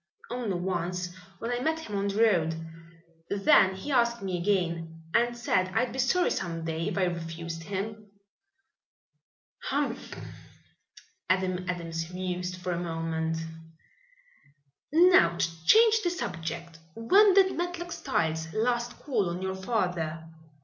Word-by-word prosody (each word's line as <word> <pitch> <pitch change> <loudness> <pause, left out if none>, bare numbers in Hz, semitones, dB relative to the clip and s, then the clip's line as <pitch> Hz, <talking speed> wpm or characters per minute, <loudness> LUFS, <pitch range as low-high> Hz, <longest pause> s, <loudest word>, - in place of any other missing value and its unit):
"Only 240 -6 -2
once, 180 0 -2 0.2
when 230 +5 -4
I 245 - 0
met 320 +5 0
him 210 -9 -6
on 200 0 0
the 205 +3 +2
road. 165 -7 +3 0.7
Then 195 -1 +4
he 240 +10 -6
asked 235 -3 +2
me 185 -2 -2
again, 170 -4 -1
and 240 0 +2
said 185 -6 +1
I'd 230 +1 +1
be 265 - -5
sorry 355 +8 +2
some 165 -3 -3
day 165 0 -2
if - - -3
I 190 - +2
refused 165 -1 -4
him." 210 +4 -5 1.6
"Humph!" 275 -3 -2 1.1
Adam 185 -1 0
Adams 165 -1 -3
mused 180 0 -3
for 180 0 -4
a 170 - -1
moment. 165 -1 -2 1.5
"Now 315 - +6
to 165 -1 -2
change 445 0 +6
the 355 - +1
subject. 170 - -5 0.2
When 385 - +5
did 385 -1 +5
Matlock 350 0 -3
Styles 160 - -1
last 240 +2 0
call 220 -11 0
on 175 +2 -4
your 190 0 -1
father?" 180 -6 -2
185 Hz, 135 wpm, -28 LUFS, 170-240 Hz, 1.6 s, Now